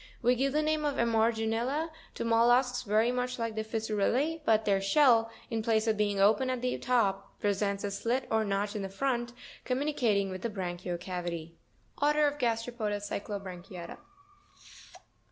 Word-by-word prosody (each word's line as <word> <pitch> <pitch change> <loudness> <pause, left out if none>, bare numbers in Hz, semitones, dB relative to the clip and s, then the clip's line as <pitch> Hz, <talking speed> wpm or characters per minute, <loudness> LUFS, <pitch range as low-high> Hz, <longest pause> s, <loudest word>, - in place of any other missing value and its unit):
We 245 - +5
give 270 +2 0
the 305 +1 +2
name 310 0 0
of 290 -2 0
Emarginula 230 +6 +1 0.2
to - - -3
mollusks 240 +2 +3
very 220 +1 +2
much 250 0 -2
like 230 -2 -2
the 220 0 -2
Fissurelle, 225 +8 0
but 220 -1 +3
their 195 -1 +2
shell, 230 +1 +4 0.2
in 225 -1 0
place 220 0 +1
of 220 -1 +2
being 205 -1 0
open 215 +6 +4
at 255 -1 -2
the 250 - 0
top, 205 -6 0
presents 200 -1 0
a 205 - -2
slit 235 +6 -1
or 220 0 +3
notch 205 +1 -1
in 195 -2 -3
front, 240 +3 -1 0.3
communicating 250 -8 0
with 185 0 -6
the 235 - -2
branchial 180 -3 -4
cavity. 175 -2 -5 0.5
ORDER 300 +1 +4
OF 290 0 -1
GASTEROPODA 230 -3 -1
CYCLOBRANCHIATA. 195 -3 -6
225 Hz, 155 wpm, -30 LUFS, 200-250 Hz, 0.5 s, We